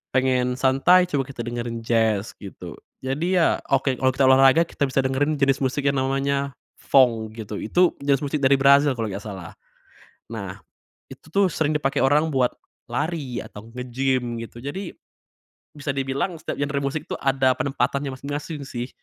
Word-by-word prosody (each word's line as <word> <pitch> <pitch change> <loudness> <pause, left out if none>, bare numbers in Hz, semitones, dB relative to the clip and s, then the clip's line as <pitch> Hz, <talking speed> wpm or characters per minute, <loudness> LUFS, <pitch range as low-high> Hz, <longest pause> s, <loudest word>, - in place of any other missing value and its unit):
pengen 130 -1 +2
santai, 135 +8 +5
coba 140 -5 0
kita 135 -3 -12
dengerin 120 -1 -4
jazz, 110 -3 +1
gitu. 100 -2 -9 0.3
Jadi, 150 +8 -1
ya 165 - +3 0.2
oke 135 -1 +2
kalo 130 +1 +2
kita 135 - +2
olahraga 135 +4 +6
kita 140 - -1
bisa 135 0 +1
dengerin 135 +3 0
jenis 135 -1 +2
musik 135 +2 -1
yang 140 - -1
namanya 140 +1 -1 0.2
fong 115 -5 +2
gitu, 110 -2 -6
itu 175 +10 +2
jenis 140 -1 +2
musik 145 +1 -1
dari 135 +1 +5
Brazil 140 +1 +6
kalo 110 -2 -2
nggak 100 +1 -6
salah. 95 -5 -8 0.8
Nah, 100 -4 -6 0.5
itu - - -13
tuh 200 +1 +3
sering 155 -2 0
dipake 135 -3 -1
orang 150 +4 +3
buat 125 -2 +2 0.4
lari 145 -1 -2
atau 105 +1 -11
nge-gym, 125 0 -1
gitu. 115 +1 -11
Jadi, 175 +6 -5 0.8
bisa 145 -1 -3
dibilang 135 +6 -1
setiap - - -5
genre 140 0 -1
musik 140 +3 -3
tuh - - -4
ada 135 -1 +3
penempatannya 140 +1 -1
masing-masing 145 +2 -5
sih. 120 -1 -5
135 Hz, 165 wpm, -23 LUFS, 125-140 Hz, 0.8 s, olahraga